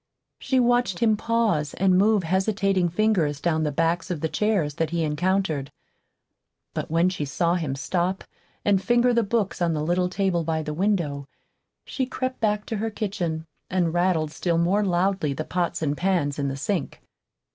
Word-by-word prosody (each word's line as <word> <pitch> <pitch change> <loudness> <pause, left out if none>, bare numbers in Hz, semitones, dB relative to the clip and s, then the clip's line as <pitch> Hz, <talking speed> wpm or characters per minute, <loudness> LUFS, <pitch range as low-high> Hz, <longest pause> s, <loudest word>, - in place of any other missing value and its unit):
She 260 - +1
watched 245 -6 +2
him 220 0 +3
pause 215 -10 0
and 185 0 +3
move 205 +1 +3
hesitating 190 0 +1
fingers 175 -6 +1
down 160 0 0
the 150 -1 0
backs 165 +3 0
of 175 -4 -2
the 160 - -1
chairs 200 -9 0
that 165 - +1
he 170 0 -1
encountered. 160 -2 0 1.0
But - - -4
when 165 +3 +3
she 180 -5 -3
saw 170 +4 0
him 160 -7 -1
stop 175 +6 -1 0.4
and 200 -2 +3
finger 240 +3 +3
the 235 - +3
books 210 -3 -1
on 170 -1 +2
the 150 -1 -1
little 180 +3 +1
table 185 -2 0
by 160 0 -1
the 150 - -4
window, 160 -6 -1 0.6
she 260 -2 -2
crept 255 0 -3
back 210 -1 0
to 220 - -3
her 225 +2 -1
kitchen 180 -7 -3 0.2
and 175 -3 0
rattled 175 -3 +1
still 170 +1 -1
more 185 +5 +2
loudly 185 -4 +1
the 155 +3 -4
pots 175 -2 -2
and 145 -1 0
pans 170 -5 0
in 140 - 0
the 135 0 -3
sink. 170 +3 -2
180 Hz, 180 wpm, -25 LUFS, 160-205 Hz, 1.0 s, him